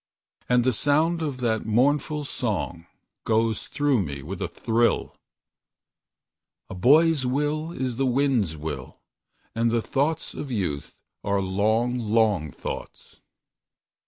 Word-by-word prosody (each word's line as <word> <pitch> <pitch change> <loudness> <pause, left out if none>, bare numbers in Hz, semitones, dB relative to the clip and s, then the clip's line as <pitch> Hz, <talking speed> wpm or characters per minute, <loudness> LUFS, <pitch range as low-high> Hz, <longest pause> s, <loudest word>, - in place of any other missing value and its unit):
And 125 -1 +4
the 130 +1 +2
sound 155 +6 +2
of 145 -5 -2
that 110 -2 0
mournful 145 +6 +2
song 100 -11 -3 0.4
Goes 110 -1 +1
through 145 -6 +1
me 70 -5 -5
with 95 +6 -6
a 95 - 0
thrill: 115 +7 0 1.6
"A - - -4
boy's 145 - +4
will 150 +4 -1
is 130 -7 -3
the 135 0 +1
wind's 125 - +1
will, 75 -4 -6 0.6
And 115 +1 +1
the 115 0 +2
thoughts 145 +7 -1
of 145 - -6
youth 90 - -3 0.3
are 100 0 +1
long, 110 +6 +1
long 105 -7 +2
thoughts." - - -8
115 Hz, 125 wpm, -25 LUFS, 100-140 Hz, 1.6 s, And